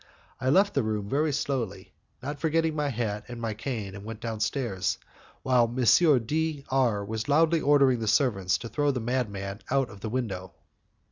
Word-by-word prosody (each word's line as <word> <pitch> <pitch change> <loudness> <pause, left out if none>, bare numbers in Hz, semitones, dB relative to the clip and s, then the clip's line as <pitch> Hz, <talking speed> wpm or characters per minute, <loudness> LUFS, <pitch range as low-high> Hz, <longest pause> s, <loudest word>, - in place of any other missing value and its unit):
I 130 - 0
left 195 +8 +4
the 140 - +2
room 105 -3 -2
very 150 +7 +1
slowly, 120 -9 -3 0.3
not 145 +2 -4
forgetting 160 0 +1
my 150 -1 0
hat 110 -4 -3
and 120 -1 -7
my 115 -2 -2
cane, 110 -3 -4
and 100 0 -9
went 110 0 -7
downstairs, 110 -4 -2 0.5
while 125 -2 +4
M. 130 0 +5
D 155 +1 -1
R 120 -6 +1
was 110 +4 -4
loudly 160 +2 +4
ordering 140 -3 +4
the 110 - -3
servants 105 -5 +2
to 115 - -7
throw 145 +4 0
the 130 -3 0
madman 105 -5 -2
out 135 -1 +1
of 100 - -12
the 110 - -4
window. 100 -7 -3
120 Hz, 180 wpm, -27 LUFS, 105-140 Hz, 0.5 s, M